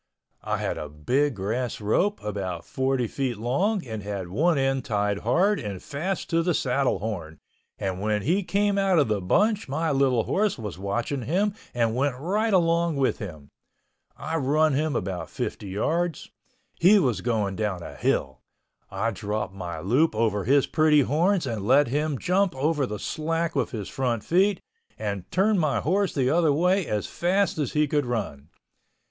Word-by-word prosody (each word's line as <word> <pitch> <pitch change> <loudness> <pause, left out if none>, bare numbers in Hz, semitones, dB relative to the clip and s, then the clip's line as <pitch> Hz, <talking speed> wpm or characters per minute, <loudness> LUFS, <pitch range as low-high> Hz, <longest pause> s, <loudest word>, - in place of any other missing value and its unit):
I - - -2
had - - -3
a 75 - -6
big 125 - 0
grass 115 +6 -2
rope 180 - 0
about 95 -5 -4
40 130 -1 0
feet 125 0 -2
long 180 - 0
and 110 -3 -5
had 100 -3 -5
one 160 - +2
end 135 -1 +1
tied 105 -2 0
hard 180 - +2
and 100 -4 -5
fast 170 - -4
to 165 0 +3
the 170 -1 +1
saddle 135 0 +1
horn 85 -7 -5 0.4
and 95 -1 -3
when 105 -1 0
he 180 +8 +2
came 200 +1 +1
out 195 -2 +3
of 145 -7 +3
the 105 -2 0
bunch 205 - +1
my 160 +4 0
little 135 -4 +2
horse 205 - 0
was 105 -6 -6
watching 120 +8 -2
him 190 - 0 0.2
and 115 -2 +1
went 135 0 0
right 205 - 0
along 170 -3 +2
with 135 -2 +1
him. 80 - -8 0.7
I 165 - -3
run 155 +2 +2
him 150 0 0
about 90 -4 -3
50 105 - -4
yards. 160 - -1 0.5
He 190 +5 +7
was 125 - +1
going 105 -4 -1
down 100 -5 -2
a - - -8
hill. 65 -1 -1 0.5
I 100 +4 -1
dropped 105 0 -3
my 85 -4 -6
loop 125 - +2
over 110 -3 0
his 140 +3 +4
pretty 155 -2 +4
horns 170 +7 +1
and 115 -5 -3
let 135 +1 +5
him 150 +2 0
jump 185 +3 +1
over 145 0 0
the 105 - -4
slack 165 +7 -2
with 135 -4 0
his 105 -4 -5
front 120 -5 -2
feet, 190 +3 +2 0.4
and 100 -3 -4
turned 200 +2 +2
my 145 -8 +1
horse 190 - +1
the 130 -3 +1
other 165 -1 +3
way 180 +5 +2
as 105 -1 -1
fast 190 0 0
as 145 - -1
he 150 0 +2
could 145 -2 0
run. 95 -11 -4
135 Hz, 175 wpm, -25 LUFS, 105-165 Hz, 0.7 s, He